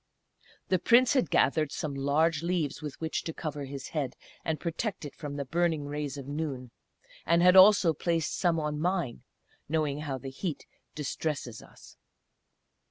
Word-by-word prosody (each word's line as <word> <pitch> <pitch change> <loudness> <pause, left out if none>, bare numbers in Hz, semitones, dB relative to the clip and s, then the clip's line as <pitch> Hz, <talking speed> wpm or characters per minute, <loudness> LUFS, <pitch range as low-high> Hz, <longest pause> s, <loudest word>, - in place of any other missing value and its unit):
The 185 - +3
Prince 240 - +5
had 255 - +2
gathered 145 +2 +2
some 150 -2 -3
large 145 +3 +1
leaves 170 -5 -1
with 150 -3 -7
which 160 -1 -2
to 160 - -6
cover 145 -3 -4
his 135 0 -7
head, 145 -5 -3 0.3
and 160 -1 -2
protect 175 +1 -3
it 145 - -7
from 145 -2 -7
the 140 -1 -3
burning 165 0 0
rays 145 -1 -4
of 135 -1 -8
noon, 140 -5 -4 0.5
and 170 +1 +3
had 180 +1 +7
also 190 -3 +7
placed 165 0 -1
some 170 -3 +1
on 150 -1 -2
mine, 175 -8 -1 0.5
knowing 150 -2 0
how 145 -3 -3
the 135 +1 -7
heat 160 +3 -4 0.3
distresses 145 -5 -3
us. - - -16
155 Hz, 165 wpm, -29 LUFS, 140-170 Hz, 0.5 s, had